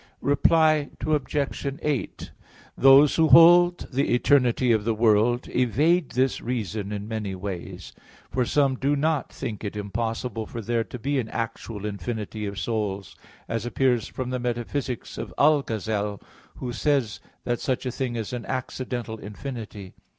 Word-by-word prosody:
Reply 155 +1 +3 0.2
Obj. 145 -2 -1
8: 145 -5 -3 0.4
Those 135 +2 +6
who 160 -1 +5
hold 175 +2 +7
the 135 -1 +2
eternity 125 -1 +3
of 110 -2 +2
the 115 0 0
world 115 +2 +3
evade 150 - +2
this 130 0 +1
reason 110 -4 -3
in 105 0 -5
many 105 -4 -4
ways. 95 -2 -7 0.4
For 130 - +1
some 135 +1 +2
do 140 +3 +1
not 155 0 0
think 115 -6 -6
it 105 0 -4
impossible 110 +2 -3
for 115 - -7
there 115 +1 -1
to 125 - -8
be 135 +3 -1
an 115 -3 -3
actual 115 -2 -5
infinity 105 0 -4
of 100 0 -6
souls, 100 0 -3 0.3
as 115 -2 -2
appears 120 -2 +1
from 130 -1 -5
the 125 - -2
Metaphysics 125 +1 -3
of - - -7
Algazel, 110 -8 +1 0.4
who 125 -2 -5
says 130 -3 0 0.2
that 120 -1 -1
such 130 -1 -2
a 125 - -1
thing 125 -1 -3
is 115 0 -4
an 120 -2 -5
accidental 125 -3 -4
infinity. 105 -3 -8
120 Hz, 150 wpm, -25 LUFS, 110-135 Hz, 0.4 s, hold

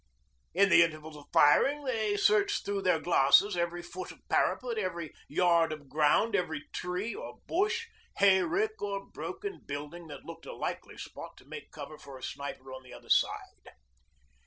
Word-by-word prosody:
In 200 0 +5
the 175 - +7
intervals 155 -2 -1
of 145 -1 -12
firing 275 - +5
they 220 -5 0
searched 405 - +3
through 200 -1 -1
their 180 -4 +2
glasses 175 +5 +4
every 175 0 -2
foot 175 +1 -7
of - - -18
parapet, 240 -3 +1
every 170 -5 -4
yard 170 0 +3
of 150 -3 -8
ground, 155 +9 +3
every 160 -6 -2
tree 180 +6 -3
or - - -8
bush, 430 +6 0 0.3
hayrick 320 - +3
or 200 -1 -3
broken 395 +1 -6
building 150 +4 -7
that 145 -3 -10
looked - - -10
a - - -7
likely - - -5
spot - - -9
to - - -17
make - - -9
cover 155 - -9
for 140 -2 -11
a 130 - -14
sniper 135 -2 -6
on 130 - -8
the 130 - -16
other - - -13
side. - - 0
180 Hz, 170 wpm, -30 LUFS, 155-220 Hz, 0.3 s, the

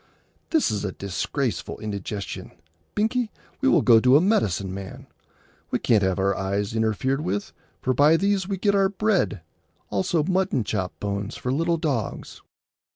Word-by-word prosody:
"This 320 -3 +2
is 105 -2 -1 0.2
disgraceful 110 +6 -2
indigestion. 100 -2 -5 0.4
Binkie, 225 +2 +1 0.3
we 270 - +4
will 170 - +4
go 115 -2 +7
to 125 +4 +6
a - - +5
medicine 105 - +1
man. 95 0 -8 0.6
We - - +1
can't 110 -3 +3
have 95 -2 +1
our 100 0 +1
eyes 100 +3 -2
interfered 110 +5 0
with, 100 -4 -3 0.3
for 130 - +2
by 150 +5 +5
these 195 0 +1
we 195 -1 -2
get 200 +2 +2
our 195 -1 +3
bread; 200 - 0 0.5
also 105 - +1
mutton 185 - +1
chop 95 -3 -3
bones 100 0 -3
for 125 - -3
little 165 +3 +1
dogs." 155 -4 -3
125 Hz, 155 wpm, -24 LUFS, -, 0.6 s, go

